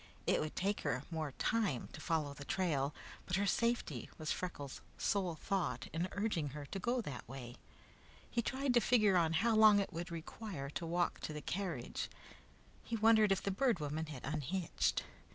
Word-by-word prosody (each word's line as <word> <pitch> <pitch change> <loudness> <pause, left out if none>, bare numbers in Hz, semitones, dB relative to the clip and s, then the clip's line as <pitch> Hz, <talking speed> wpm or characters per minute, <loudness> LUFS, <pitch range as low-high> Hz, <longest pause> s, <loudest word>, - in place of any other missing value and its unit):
It - - +3
would 155 0 -3
take 200 +2 0
her 125 +2 -1
more 155 -4 -2
time 205 - 0
to - - -8
follow 155 -4 0
the 140 - -8
trail, 145 -5 +1 0.4
but 180 - +1
her 200 +2 +2
safety 200 - 0
was 155 -1 -2
Freckles' 145 -7 -4 0.2
sole 185 -5 +1
thought 195 +2 -1
in 170 +3 0
urging 200 -8 0
her 145 - -5
to 195 - -2
go 240 +6 +1
that 130 - -7
way. 125 -2 -7 0.7
He 235 - 0
tried 265 +2 0
to 240 - +7
figure 215 -5 +4
on 165 -2 +4
how 220 +7 +3
long 215 -1 +8
it 200 - -2
would 170 +2 -4
require 165 -3 -5
to 165 - -3
walk 175 +1 +1
to 155 - -4
the 150 - -4
carriage. 190 +3 -3 0.7
He 235 - -3
wondered 220 -1 +6
if 195 - +2
the 200 - 0
Bird 235 +2 +2
Woman 155 +2 -2
had 145 -5 -7
unhitched. 155 +5 0
175 Hz, 185 wpm, -36 LUFS, 150-210 Hz, 0.7 s, long